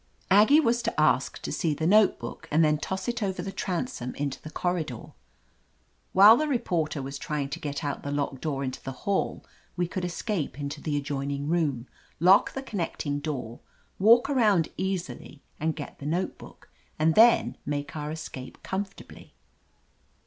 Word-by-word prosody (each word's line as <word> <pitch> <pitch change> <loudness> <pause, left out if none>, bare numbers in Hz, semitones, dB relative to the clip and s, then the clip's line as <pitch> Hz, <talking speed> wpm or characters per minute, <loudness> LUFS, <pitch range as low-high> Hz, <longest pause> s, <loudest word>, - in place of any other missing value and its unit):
Aggie 215 +10 +7
was 240 -5 +2
to - - -2
ask - - +2
to - - -3
see 160 -5 0
the 160 +2 -2
notebook 195 - +2
and 155 +2 +4
then 150 -1 +2
toss 190 +3 -4
it 240 0 -2
over 190 -2 -2
the 195 - -4
transom 180 - -3
into 140 -2 -3
the 155 - -8
corridor. 160 -8 -3 1.0
While 205 +4 +8
the 310 - 0
reporter 175 - -1
was 135 +1 -6
trying 145 -2 -3
to 160 +4 -5
get 145 +1 -4
out 145 -1 -3
the 145 - -5
locked 145 -2 -2
door 140 -3 -2
into 130 -1 -4
the 135 - -6
hall 200 -1 -1 0.3
we 175 0 +1
could 180 +1 -4
escape 175 - -3
into 140 0 -5
the 150 -2 -1
adjoining 140 0 -3
room, 145 -8 0 0.3
lock 185 +5 +5
the 270 - -5
connecting 165 - -3
door, 130 -6 -5 0.4
walk 230 +6 +6
around 215 - +3
easily 180 -5 -4 0.2
and 160 +1 0
get 145 - -8
the 145 - -6
notebook, 175 +5 -4 0.3
and 160 +1 +3
then 230 +4 +5
make 145 0 -4
our 150 -1 -4
escape 150 -4 -8
comfortably. 195 +1 -6
160 Hz, 165 wpm, -27 LUFS, 145-195 Hz, 1.0 s, While